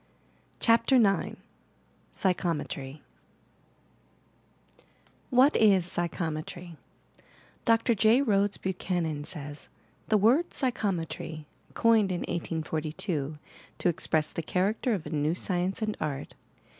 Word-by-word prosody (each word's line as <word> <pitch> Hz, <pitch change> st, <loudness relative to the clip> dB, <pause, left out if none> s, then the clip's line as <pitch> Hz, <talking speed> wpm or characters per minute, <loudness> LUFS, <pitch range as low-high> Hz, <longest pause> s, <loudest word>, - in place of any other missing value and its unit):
CHAPTER 230 Hz, +3 st, +4 dB
IX 205 Hz, -6 st, +3 dB, 0.8 s
PSYCHOMETRY 160 Hz, -6 st, -2 dB, 2.3 s
What 260 Hz, +3 st, +5 dB
is 195 Hz, -5 st, +5 dB
Psychometry 170 Hz, 0 st, -4 dB
I -, -, -34 dB, 0.5 s
Dr. 230 Hz, 0 st, +3 dB
J, 225 Hz, +5 st, +4 dB
Rhodes 205 Hz, -4 st, +2 dB
Buchanan 175 Hz, -5 st, -2 dB
says: 145 Hz, -3 st, -8 dB, 0.4 s
"The 215 Hz, -, +4 dB
word 250 Hz, -, +3 dB
'Psychometry,' 175 Hz, -, -2 dB, 0.3 s
coined 225 Hz, -4 st, +4 dB
in 175 Hz, -, -2 dB
1842 155 Hz, -2 st, -3 dB, 0.4 s
to -, -, +1 dB
express 155 Hz, -2 st, 0 dB
the -, -, -3 dB
character 200 Hz, +8 st, 0 dB
of 175 Hz, -, -6 dB
a 150 Hz, -, -7 dB
new 155 Hz, +1 st, 0 dB
scienee 185 Hz, 0 st, -1 dB
and 215 Hz, -1 st, -1 dB
art, 140 Hz, -2 st, -4 dB
i? -, -, -35 dB
180 Hz, 105 wpm, -28 LUFS, 155-215 Hz, 2.3 s, What